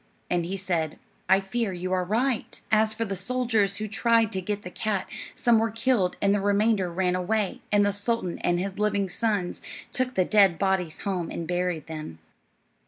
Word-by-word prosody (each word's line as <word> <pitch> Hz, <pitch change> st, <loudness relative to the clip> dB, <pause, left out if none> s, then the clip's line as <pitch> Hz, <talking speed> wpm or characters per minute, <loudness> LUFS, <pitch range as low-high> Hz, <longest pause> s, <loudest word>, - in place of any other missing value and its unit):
And 175 Hz, -1 st, +1 dB
he 195 Hz, +2 st, -3 dB
said, 170 Hz, -5 st, -1 dB, 0.3 s
"I 190 Hz, +1 st, +6 dB
fear 200 Hz, +2 st, -2 dB
you 185 Hz, +1 st, -3 dB
are 185 Hz, -1 st, +1 dB
right." 230 Hz, +6 st, -1 dB
As 215 Hz, 0 st, +4 dB
for 230 Hz, +1 st, -2 dB
the 195 Hz, -2 st, -3 dB
soldiers 220 Hz, -1 st, +1 dB
who 215 Hz, +1 st, -4 dB
tried 225 Hz, +1 st, +2 dB
to 190 Hz, -, -1 dB
get 205 Hz, +2 st, -3 dB
the 180 Hz, -, -7 dB
cat, 200 Hz, -1 st, -1 dB, 0.3 s
some 235 Hz, -2 st, +4 dB
were 225 Hz, +1 st, +1 dB
killed 225 Hz, -4 st, +1 dB
and 200 Hz, 0 st, +4 dB
the 205 Hz, -, +1 dB
remainder 200 Hz, -2 st, +2 dB
ran 180 Hz, +1 st, +1 dB
away, 195 Hz, +2 st, -1 dB
and 205 Hz, -1 st, +4 dB
the 205 Hz, -, +1 dB
sultan 205 Hz, -3 st, -1 dB
and 175 Hz, 0 st, +1 dB
his 195 Hz, +2 st, -4 dB
living 205 Hz, -2 st, +1 dB
sons 205 Hz, -2 st, -1 dB, 0.3 s
took 255 Hz, -1 st, -1 dB
the 185 Hz, -, +3 dB
dead 195 Hz, -5 st, +5 dB
bodies 190 Hz, -4 st, 0 dB
home 185 Hz, -4 st, -2 dB
and 165 Hz, -, -5 dB
buried 175 Hz, -3 st, -1 dB
them. 155 Hz, -, -7 dB
195 Hz, 190 wpm, -26 LUFS, 180-220 Hz, 0.3 s, I